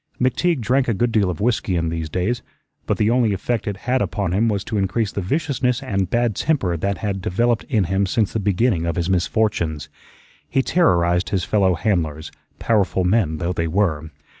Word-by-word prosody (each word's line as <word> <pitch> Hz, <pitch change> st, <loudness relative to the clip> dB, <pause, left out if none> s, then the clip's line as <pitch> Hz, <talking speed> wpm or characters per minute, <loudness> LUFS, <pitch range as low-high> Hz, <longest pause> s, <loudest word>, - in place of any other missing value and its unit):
McTeague 130 Hz, +4 st, +1 dB
drank 130 Hz, +4 st, +1 dB
a 115 Hz, -, +1 dB
good 120 Hz, +4 st, +1 dB
deal 105 Hz, -4 st, +2 dB
of 90 Hz, -, -4 dB
whiskey 110 Hz, -5 st, 0 dB
in 85 Hz, -1 st, 0 dB
these 80 Hz, -1 st, -4 dB
days, 95 Hz, +9 st, -1 dB, 0.5 s
but -, -, 0 dB
the 105 Hz, +1 st, +2 dB
only 120 Hz, -4 st, +2 dB
effect 110 Hz, +4 st, -2 dB
it 100 Hz, -1 st, -2 dB
had 130 Hz, +1 st, +1 dB
upon 100 Hz, -5 st, -1 dB
him 110 Hz, +5 st, +2 dB
was 100 Hz, -3 st, -1 dB
to 105 Hz, 0 st, -2 dB
increase 100 Hz, +2 st, 0 dB
the 100 Hz, -, -3 dB
viciousness 125 Hz, -, -1 dB
and 95 Hz, -3 st, -1 dB
bad 120 Hz, -3 st, +1 dB
temper 130 Hz, -, 0 dB
that 100 Hz, +4 st, -2 dB
had 100 Hz, -3 st, -3 dB
developed 115 Hz, +4 st, 0 dB
in 110 Hz, -9 st, +1 dB
him 95 Hz, +2 st, 0 dB
since 105 Hz, +2 st, 0 dB
the 115 Hz, -, 0 dB
beginning 100 Hz, -3 st, +1 dB
of 85 Hz, -, -1 dB
his 85 Hz, +2 st, -1 dB
misfortunes. 85 Hz, -6 st, 0 dB, 0.6 s
He 135 Hz, -, +1 dB
terrorized 90 Hz, -, +2 dB
his 95 Hz, -3 st, 0 dB
fellow 95 Hz, -3 st, +2 dB
handlers, 80 Hz, -6 st, -1 dB, 0.3 s
powerful 100 Hz, -4 st, +1 dB
men 90 Hz, -4 st, +1 dB
though 85 Hz, +3 st, -2 dB
they 85 Hz, -1 st, -1 dB
were. 80 Hz, -4 st, 0 dB
100 Hz, 195 wpm, -21 LUFS, 90-115 Hz, 0.6 s, deal